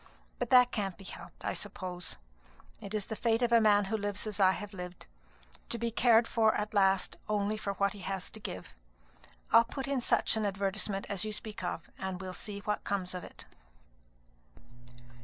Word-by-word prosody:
But 245 - -2
that 250 -1 +7
can't 195 -5 -2
be 195 - -12
helped, - - -10
I - - 0
suppose; 180 -2 -4 0.6
it 205 0 -5
is 210 -2 0
the 220 - -5
fate 230 +1 +1
of 240 - +2
a 230 -1 +6
man 205 -2 +5
who 220 - -1
lives 205 0 -2
as 215 -1 -4
I 190 -1 +6
have 205 +1 -7
lived, 180 -1 -8 0.6
to 235 - +1
be 235 0 -1
cared 230 0 +5
for 220 -2 +3
at 210 +1 -2
last 195 -2 +3
only 210 0 +1
for 200 -2 -3
what 200 0 +1
he 205 - -10
has 190 0 -3
to 220 - -7
give. 90 - -7 0.8
I'll 230 +1 +8
put 265 +3 -5
in 275 -2 0
such 235 - +3
an 220 - 0
advertisement 195 0 -1
as 200 -3 +1
you 215 - -2
speak 215 +1 -3
of; - - -4
and 190 -1 -3
we'll 185 -1 -6
see 200 +1 -4
what 210 +1 -2
comes 185 -2 -2
of 180 - -5
it." - - -10
205 Hz, 195 wpm, -31 LUFS, 195-225 Hz, 0.8 s, I'll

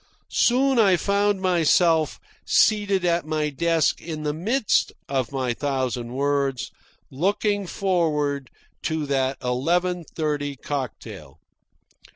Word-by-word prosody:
Soon 260 +1 +3
I 195 -5 +5
found 200 +1 +1
myself, 170 -3 +3 0.2
seated 205 -3 +2
at 170 0 +2
my 155 -1 -1
desk 165 +2 +1
in 155 -2 -6
the 150 -1 -1
midst 215 - +1 0.2
of 135 -3 -1
my 130 -3 -1
thousand 130 -3 -2
words, 135 -2 -1 0.4
looking 200 +6 0
forward 150 -8 0 0.3
to 160 -1 -2
that 135 -1 0
eleven 175 +8 0
thirty 150 -3 -3
cocktail. 135 -2 -6
155 Hz, 110 wpm, -24 LUFS, 140-185 Hz, 0.4 s, I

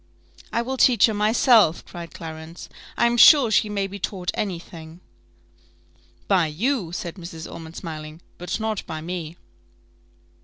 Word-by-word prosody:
"I 235 - 0
will 260 +2 -4
teach 245 -5 +5
her 220 - 0
myself," 215 -3 +3
cried 170 -1 -9
Clarence: 160 +1 -9 0.3
"I - - +3
am 235 0 +2
sure 265 -2 +7
she 215 0 +2
may 200 -1 -1
be 200 +1 -8
taught 180 -2 -3
any 195 -4 -2
thing." 165 -1 -12 1.3
"By 185 -5 +3
you," 195 - -1
said 175 +1 -6
Mrs. 170 -2 -8
Ormond, 165 0 -10
smiling; 155 -2 -8 0.2
"but 180 +5 -4
not 220 -2 -2
by 155 -1 -5
me." 170 -1 -6
180 Hz, 150 wpm, -23 LUFS, 165-220 Hz, 1.3 s, sure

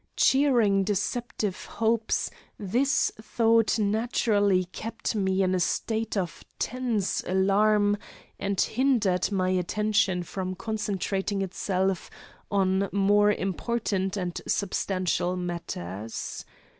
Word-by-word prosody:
Cherishing 240 -8 +4
deceptive 210 0 -2
hopes, 225 0 0 0.3
this 245 +8 +1
thought 225 0 +2
naturally 205 -3 +2
kept 225 +6 -4
me 190 -2 +1
in 185 0 +1
a 185 - +1
state 220 +4 -1
of 180 -3 -3
tense 240 -6 -1
alarm 205 +2 +3 0.4
and 200 -1 -2
hindered 220 -8 +2
my 185 -2 +1
attention 185 0 +1
from 185 +1 -4
concentrating 200 -1 -2
itself 190 0 -1 0.4
on 195 0 +1
more 205 +1 +4
important 195 0 -1
and 180 -2 -3
substantial 185 -2 0
matters. 115 - -5
200 Hz, 95 wpm, -27 LUFS, 185-220 Hz, 0.4 s, Cherishing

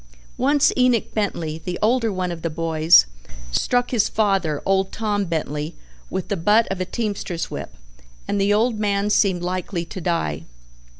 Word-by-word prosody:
Once 285 +2 +3
Enoch 250 -3 +2
Bentley, 165 -7 -2
the 180 +1 -3
older 230 +1 +2
one 185 -2 -2
of 170 -1 -6
the 165 - -2
boys, 160 - +4 0.5
struck 245 - +1
his 235 -5 +2
father, 195 -8 +1
old 195 0 +1
Tom 205 -2 -1
Bentley, 155 -1 -3 0.3
with 190 0 -3
the 200 - 0
butt 210 +6 +3
of 190 -1 -3
a - - 0
teamster's 200 -5 -3
whip, - - -6 0.5
and 200 - 0
the 200 +1 +2
old 220 +1 +2
man 205 0 0
seemed 190 -4 +2
likely 180 -1 -3
to 180 +2 -8
die. 165 - -1
195 Hz, 165 wpm, -22 LUFS, 170-215 Hz, 0.5 s, boys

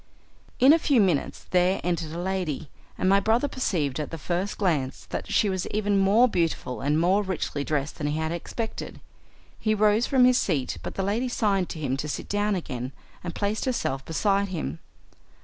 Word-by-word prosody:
In 265 +4 +7
a 330 - +4
few 280 -5 +3
minutes 180 -8 +1
there 180 +1 +3
entered 170 -3 -1
a 165 - -5
lady, 175 -5 -3 0.3
and 185 - 0
my 195 +1 +5
brother 225 +7 +2
perceived 155 - -1
at 150 - -3
the 165 - -6
first 180 +6 -2
glance 155 -10 -1
that - - -4
she 215 - +3
was 185 -2 -1
even 205 -1 +1
more 205 +6 +5
beautiful 165 - -1
and 145 +3 +1
more 185 +5 +3
richly 180 -7 -3
dressed 145 0 -2
than 150 - -1
he 150 +1 -1
had 160 0 -1
expected. 220 +6 -5 0.6
He 215 -1 +1
rose 215 +2 +3
from 260 -2 +5
his 250 0 +5
seat, 140 -9 -1
but - - -6
the 195 - -1
lady 225 +6 0
signed 200 -6 +1
to 160 - -6
him 135 -3 -1
to 150 +2 -4
sit - - -4
down 205 0 +1
again 130 -7 -5 0.3
and 175 -1 -5
placed 205 +1 -1
herself 135 - -1
beside 200 +5 +1
him. 85 - -4
185 Hz, 195 wpm, -26 LUFS, 155-210 Hz, 0.6 s, In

